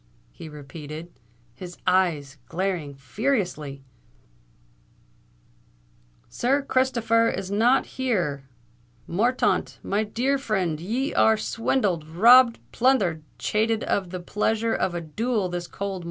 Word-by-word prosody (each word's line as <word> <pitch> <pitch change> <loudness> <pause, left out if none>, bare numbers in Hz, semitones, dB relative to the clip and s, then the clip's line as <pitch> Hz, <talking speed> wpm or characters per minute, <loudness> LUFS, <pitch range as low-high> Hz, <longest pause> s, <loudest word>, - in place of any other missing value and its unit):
he 160 - -10
repeated, 150 +3 -9 0.4
his 175 +5 -10
eyes 160 -7 +1
glaring 175 -6 -3
furiously, 150 - -2 2.4
"Sir 275 +4 0
Christopher 230 -4 +2
is 190 0 -4
not 240 +6 +3
here! 175 - -2 0.6
Morthaunt, 235 +9 +1
my 205 +2 0
dear 255 +6 0
frind, 190 - -1
ye 245 - -2
are 220 0 +4
swindled—robbed—plunthered—chated 220 - +2
of 190 -3 -1
the 185 +1 -5
pleasure 220 +5 0
of 175 - -1
a 170 - -2
duel 210 +5 -1
this 175 0 -4
cold 200 0 -4
mornin'. 190 - -5
195 Hz, 100 wpm, -25 LUFS, 165-230 Hz, 2.4 s, are